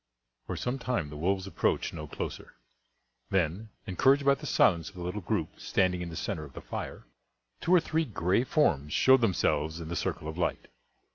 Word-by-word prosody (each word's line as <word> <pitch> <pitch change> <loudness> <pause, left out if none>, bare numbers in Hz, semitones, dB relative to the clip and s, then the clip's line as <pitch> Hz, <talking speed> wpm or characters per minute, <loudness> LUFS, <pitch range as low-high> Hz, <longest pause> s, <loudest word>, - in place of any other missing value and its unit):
For - - -3
some 125 +2 -2
time 115 - -2
the - - -8
wolves 95 +5 0
approached 95 - 0
no 75 -2 -6
closer; - - -6 0.7
then, 95 +4 0 0.2
encouraged 135 +8 +3
by 140 - +6
the 150 +2 -6
silence 85 - +3
of - - -19
the 90 - -6
little 90 +4 -3
group - - -2
standing 90 -2 +1
in 85 - -4
the 80 - -7
centre 80 - -3
of 70 -2 -11
the - - -7
fire, - - -6 0.6
two 170 - -2
or - - +7
three 160 0 0
gray 95 - +1
forms 75 - +1
showed 130 -1 +6
themselves 80 -6 +1
in 80 -1 -7
the 85 - -3
circle 75 - -2
of 80 +2 -5
light. - - -1
90 Hz, 195 wpm, -29 LUFS, 80-125 Hz, 0.7 s, or